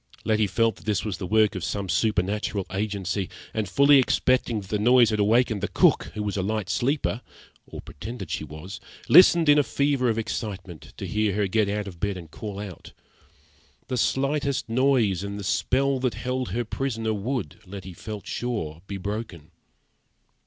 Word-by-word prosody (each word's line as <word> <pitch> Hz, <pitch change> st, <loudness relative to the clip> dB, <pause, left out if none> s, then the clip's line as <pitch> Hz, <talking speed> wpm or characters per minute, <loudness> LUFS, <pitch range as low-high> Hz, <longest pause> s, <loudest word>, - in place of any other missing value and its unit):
Letty 110 Hz, -1 st, +2 dB
felt 115 Hz, +2 st, +1 dB
that -, -, -17 dB
this 105 Hz, -2 st, 0 dB
was 100 Hz, -4 st, -3 dB
the 95 Hz, -, -4 dB
work 110 Hz, +1 st, +3 dB
of 95 Hz, -, -5 dB
some 100 Hz, -1 st, -2 dB
supernatural 100 Hz, 0 st, 0 dB
agency, 100 Hz, -1 st, -2 dB, 0.2 s
and, 110 Hz, -3 st, -2 dB
fully 140 Hz, +6 st, +6 dB
expecting 125 Hz, -3 st, +2 dB
that 95 Hz, -, -13 dB
the 105 Hz, -, 0 dB
noise 120 Hz, +1 st, +5 dB
had 105 Hz, -, -1 dB
awakened 110 Hz, 0 st, +3 dB
the 105 Hz, -, 0 dB
cook, -, -, +3 dB
who 105 Hz, -, -2 dB
was 105 Hz, -1 st, -2 dB
a 100 Hz, -, 0 dB
light 105 Hz, 0 st, -2 dB
sleeper 125 Hz, 0 st, 0 dB, 0.5 s
(or -, -, -8 dB
pretended 110 Hz, -, -8 dB
she 80 Hz, -, -2 dB
was), 80 Hz, +7 st, -8 dB, 0.3 s
listened 170 Hz, -3 st, +7 dB
in 145 Hz, 0 st, +7 dB
a -, -, +4 dB
fever 140 Hz, -3 st, +1 dB
of 115 Hz, -, 0 dB
excitement 95 Hz, -6 st, -5 dB
to -, -, -5 dB
hear 105 Hz, -2 st, 0 dB
her 105 Hz, -1 st, +1 dB
get 105 Hz, +1 st, +1 dB
out 105 Hz, 0 st, -2 dB
of 90 Hz, -4 st, -9 dB
bed 100 Hz, 0 st, -1 dB
and 85 Hz, -3 st, -11 dB
call 105 Hz, -3 st, -7 dB
out. 100 Hz, -4 st, -9 dB, 1.0 s
The 130 Hz, -, -1 dB
slightest 140 Hz, +2 st, 0 dB
noise 115 Hz, -6 st, +2 dB
and 100 Hz, 0 st, -5 dB
the -, -, -6 dB
spell 135 Hz, +6 st, +1 dB
that 125 Hz, -2 st, -1 dB
held 130 Hz, 0 st, -3 dB
her 120 Hz, +6 st, -2 dB
prisoner 115 Hz, -2 st, -2 dB
would, 120 Hz, +5 st, -3 dB
Letty 95 Hz, -1 st, -8 dB
felt 105 Hz, +2 st, -8 dB
sure, 85 Hz, -11 st, -4 dB
be 100 Hz, -, -4 dB
broken. 100 Hz, -5 st, -6 dB
105 Hz, 180 wpm, -25 LUFS, 95-125 Hz, 1.0 s, listened